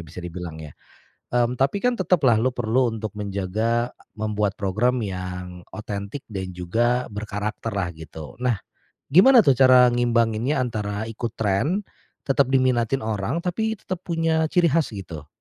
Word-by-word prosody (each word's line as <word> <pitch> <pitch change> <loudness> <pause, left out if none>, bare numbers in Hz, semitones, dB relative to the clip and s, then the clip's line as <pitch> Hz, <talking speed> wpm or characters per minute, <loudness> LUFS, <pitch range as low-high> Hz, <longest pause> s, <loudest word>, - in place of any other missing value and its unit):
bisa 80 +2 -9
dibilang 85 -2 -6
ya. 75 - -10 0.6
Mmm, 120 0 +2
tapi 135 +10 +1
kan 245 -1 +1
tetaplah 155 - +3
lu 125 +4 +1
perlu 120 0 +1
untuk 110 -2 -5
menjaga, 105 +4 -1 0.3
membuat 105 -1 0
program 115 +6 +1
yang 90 -3 -5
otentik 105 +5 -6
dan 95 -3 -5
juga 120 +8 0
berkarakterlah 105 -1 -3
gitu. 80 -1 -10
Nah 120 -4 0 0.5
gimana 225 - +7
tuh 135 -6 +3
cara 125 -1 +7
ngimbanginnya 120 +2 +1
antara 110 -2 -3
ikut 115 0 -5
tren, 115 - 0 0.4
tetap 135 -1 +1
diminatin 130 0 +2
orang 110 - -2
tapi 220 +5 -1
tetap 185 -3 -6
punya 165 -2 +1
ciri 170 -1 +3
khas 155 -7 +1
gitu? 80 -6 -8
115 Hz, 140 wpm, -23 LUFS, 100-130 Hz, 0.6 s, gimana